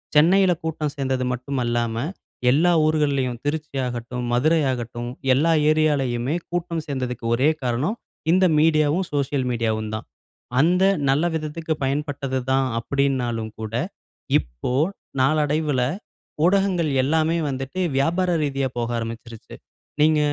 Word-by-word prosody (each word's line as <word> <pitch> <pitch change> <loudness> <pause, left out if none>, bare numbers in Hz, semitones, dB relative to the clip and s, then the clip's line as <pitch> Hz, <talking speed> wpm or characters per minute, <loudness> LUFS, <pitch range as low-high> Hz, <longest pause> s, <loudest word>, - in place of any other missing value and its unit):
சென்னையில 180 +4 +5
கூட்டம் 155 -2 -2
சேர்ந்தது 130 -2 -1
மட்டுமல்லாமல், 120 +1 -2 0.4
எல்லா 170 +6 +4
ஊர்களிலும் 140 -6 +1
திருச்சியாகட்டும் 125 -5 -3
மதுரையாகட்டும் 125 -4 0 0.2
எல்லா 160 +5 +3 0.2
ஏரியாவிலேயுமே 145 -3 +1
கூட்டம் 170 -2 -2
சேர்ந்ததுக்கு 125 -4 -4
ஒரே 135 +5 +3
காரணம் 130 - -1 0.4
இந்த 185 +1 +4
மீடியாவும், 155 +3 +3
சோசியல் 140 -2 0
மீடியாவும் 110 -2 -1
தான். 110 - -4 0.5
அந்த 180 +5 +4 0.3
நல்ல 145 +5 +3
விதத்துக்கு 160 +1 -3
பயன்பட்டதுதான் 135 -2 -1
அப்படினாலும் 120 -4 -1
கூட, 110 0 -6 0.7
இப்போ - - -5 0.5
நாளடைவில 150 -1 +2 0.7
ஊடகங்கள் 185 -4 +2
எல்லாமே 160 +4 +2
வந்துட்டு 135 +6 -4 0.2
வியாபார 175 +6 +1
ரீதியா 135 -2 0
போக 120 0 -1
ஆரம்பித்துச்சிசுருச்சு. 115 0 -7 0.5
நீங்க 155 0 +4
140 Hz, 105 wpm, -23 LUFS, 125-155 Hz, 0.7 s, சென்னையில